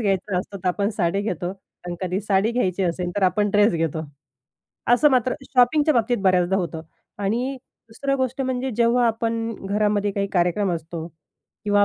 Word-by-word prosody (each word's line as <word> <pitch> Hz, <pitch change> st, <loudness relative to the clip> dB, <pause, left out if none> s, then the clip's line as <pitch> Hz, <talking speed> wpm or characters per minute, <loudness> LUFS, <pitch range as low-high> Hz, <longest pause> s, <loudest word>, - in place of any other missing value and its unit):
घ्यायचा 195 Hz, -3 st, 0 dB
असतो 200 Hz, +2 st, -6 dB
तर 185 Hz, 0 st, -1 dB
आपण 200 Hz, +3 st, 0 dB
साडी 195 Hz, -2 st, 0 dB
घेतो 180 Hz, -4 st, -2 dB, 0.4 s
आणि 175 Hz, 0 st, -4 dB
कधी 185 Hz, +1 st, -1 dB
साडी 200 Hz, +1 st, +1 dB
घ्यायची 195 Hz, -6 st, 0 dB
असेल 175 Hz, 0 st, -1 dB
तर 205 Hz, -, 0 dB
आपण 195 Hz, +3 st, +3 dB
ड्रेस 205 Hz, +1 st, +4 dB
घेतो. 165 Hz, -1 st, -1 dB, 0.9 s
असं 295 Hz, +5 st, +5 dB
मात्र 255 Hz, -1 st, +2 dB
शॉपिंगच्या 285 Hz, +4 st, +3 dB
बाबतीत 240 Hz, 0 st, +2 dB
बऱ्याचदा 185 Hz, 0 st, +3 dB
होतं. 165 Hz, -3 st, -3 dB, 0.4 s
आणि 240 Hz, +7 st, -1 dB, 0.3 s
दुसरं 275 Hz, +5 st, -2 dB
गोष्ट 260 Hz, 0 st, -2 dB
म्हणजे 260 Hz, 0 st, -2 dB
जेव्हा 240 Hz, +1 st, +3 dB
आपण 225 Hz, 0 st, -1 dB
घरामध्ये 205 Hz, 0 st, +1 dB
काही 200 Hz, 0 st, -1 dB
कार्यक्रम 180 Hz, +2 st, +1 dB
असतो. 165 Hz, 0 st, -5 dB, 0.6 s
किंवा 205 Hz, 0 st, +4 dB
205 Hz, 160 wpm, -23 LUFS, 180-235 Hz, 0.9 s, असं